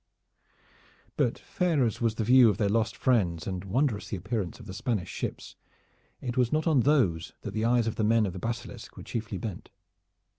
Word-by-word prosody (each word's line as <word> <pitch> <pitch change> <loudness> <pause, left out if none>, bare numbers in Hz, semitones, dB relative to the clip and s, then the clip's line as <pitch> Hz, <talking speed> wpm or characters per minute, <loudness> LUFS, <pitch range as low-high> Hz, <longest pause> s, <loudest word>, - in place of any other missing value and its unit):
But - - +1
fair 170 -7 0
as 115 - -2
was 115 -2 +1
the 115 - -1
view 125 +1 +7
of 105 - 0
their 100 -2 +1
lost 110 +1 0
friends, 90 - +1
and 95 -2 -4
wondrous 115 +2 0
the 100 - -3
appearance 105 0 -3
of 115 - -11
the 95 - -7
Spanish 105 -2 -2
ships, - - -5 0.7
it 125 -2 -4
was 125 -2 +2
not 155 0 +1
on 155 -5 +4
those 120 - +2
that - - -5
the 110 +1 -1
eyes 120 -1 +3
of 115 - -3
the 110 - +1
men 110 +1 +4
of 95 - -3
the 95 - -6
Basilisk 115 +3 -6
were - - -8
chiefly 110 -3 -4
bent. 100 +2 -6
115 Hz, 200 wpm, -28 LUFS, 100-125 Hz, 0.7 s, view